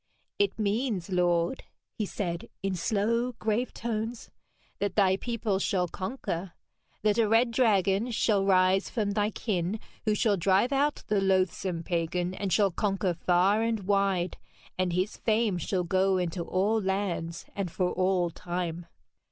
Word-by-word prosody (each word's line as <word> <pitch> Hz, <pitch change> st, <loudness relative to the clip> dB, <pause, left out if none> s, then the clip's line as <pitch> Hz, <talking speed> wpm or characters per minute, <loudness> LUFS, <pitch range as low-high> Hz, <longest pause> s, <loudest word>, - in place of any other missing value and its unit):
'It 405 Hz, -1 st, +1 dB
means, 210 Hz, -3 st, -1 dB
lord,' 175 Hz, -1 st, +1 dB, 0.3 s
he 210 Hz, -, -3 dB
said 175 Hz, -4 st, -4 dB
in 195 Hz, -1 st, 0 dB
slow 225 Hz, +7 st, 0 dB
grave 225 Hz, +2 st, -1 dB
tones, 230 Hz, 0 st, -4 dB, 0.5 s
'that 200 Hz, -2 st, -1 dB
thy 190 Hz, -2 st, +4 dB
people 220 Hz, -2 st, -2 dB
shall 185 Hz, -2 st, +1 dB
conquer 185 Hz, -2 st, -4 dB, 0.5 s
that 215 Hz, +1 st, +2 dB
a 225 Hz, -, +4 dB
red 230 Hz, +2 st, +3 dB
dragon 210 Hz, -2 st, +2 dB
shall 215 Hz, -3 st, +2 dB
rise 190 Hz, 0 st, +3 dB
from 210 Hz, -3 st, -1 dB
thy 205 Hz, 0 st, +1 dB
kin, 200 Hz, -2 st, -2 dB, 0.3 s
who 215 Hz, -1 st, +2 dB
shall 210 Hz, -1 st, +2 dB
drive 195 Hz, +7 st, +3 dB
out 285 Hz, +2 st, +1 dB
the 210 Hz, -2 st, +1 dB
loathsome 185 Hz, -2 st, +1 dB
pagan 175 Hz, +1 st, -1 dB
and 195 Hz, 0 st, -3 dB
shall 200 Hz, -1 st, +3 dB
conquer 195 Hz, -1 st, 0 dB
far 180 Hz, +5 st, +2 dB
and 225 Hz, -2 st, 0 dB
wide, 195 Hz, -3 st, +1 dB, 0.4 s
and 185 Hz, -1 st, 0 dB
his 185 Hz, +4 st, -1 dB
fame 220 Hz, -4 st, +1 dB
shall 180 Hz, +2 st, -1 dB
go 190 Hz, +2 st, +2 dB
into 175 Hz, -1 st, -2 dB
all 200 Hz, +6 st, +1 dB
lands 190 Hz, -4 st, -2 dB
and 195 Hz, -3 st, -2 dB
for 180 Hz, +2 st, -1 dB
all 185 Hz, -2 st, +1 dB
time.' 175 Hz, -1 st, -4 dB
195 Hz, 150 wpm, -28 LUFS, 180-215 Hz, 0.5 s, thy